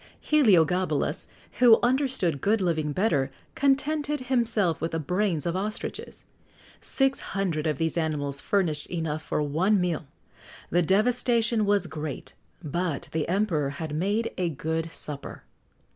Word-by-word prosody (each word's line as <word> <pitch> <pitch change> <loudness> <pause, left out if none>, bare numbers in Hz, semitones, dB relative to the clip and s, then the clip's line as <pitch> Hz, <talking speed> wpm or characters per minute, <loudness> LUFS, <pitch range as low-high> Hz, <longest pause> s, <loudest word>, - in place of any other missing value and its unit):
Heliogabalus, 185 - +2 0.3
who 240 -3 +8
understood 245 - +1
good 215 +2 +2
living 160 -5 0
better, 145 -6 +1 0.2
contented 290 +2 +1
himself 230 -9 +1
with 165 - -2
the 165 - 0
brains 180 0 -1
of 170 0 -1
ostriches. 210 +3 -5 0.5
Six 270 0 0
hundred 170 -6 -2
of 150 -3 0
these 160 +2 0
animals 145 -3 -2
furnished 165 -7 0
enough 160 -3 -3
for 150 - -1
one 180 +8 +2
meal.[XX 175 -3 -1
80] - - -29 0.6
The 175 - +3
devastation 230 +3 +2
was 200 -2 +2
great, 155 -3 -6 0.3
but 165 -1 -2
the 160 -1 -1
emperor 175 -7 +1
had 150 +2 -5
made 205 +8 0
a 180 -2 +1
good 160 +2 -3
supper. 145 -3 -7
175 Hz, 135 wpm, -26 LUFS, 155-215 Hz, 0.6 s, who